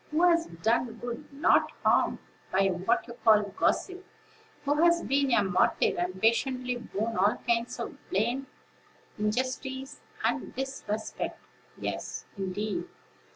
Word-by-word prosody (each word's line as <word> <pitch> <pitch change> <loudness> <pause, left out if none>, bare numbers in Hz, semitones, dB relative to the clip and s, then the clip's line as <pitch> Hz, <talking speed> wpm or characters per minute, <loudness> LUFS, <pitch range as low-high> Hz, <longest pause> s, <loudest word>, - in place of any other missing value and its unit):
Who 310 +3 +1
has 335 -1 +3
done 225 +7 0
good, 240 +5 -7
not 280 +1 +3
harm, - - +4 0.3
by 195 +1 +3
what 185 0 +1
you 235 - -7
call 215 -2 +6
'gossip'? 365 - -1 0.6
Who 290 +2 +2
has 340 0 +4
been 275 0 +2
a 210 - +4
martyr, 185 -2 +2
and 180 +2 -2
patiently 250 +3 +1
borne 225 -1 -3
all 200 +2 +3
kinds 235 +1 +1
of 235 - -5
blame, 240 +7 0 0.7
injustice, 260 +5 -2 0.2
and - - -1
disrespect? 255 -5 -4 0.4
Yes, - - -4
indeed! 200 +2 -3
235 Hz, 125 wpm, -29 LUFS, 210-270 Hz, 0.7 s, call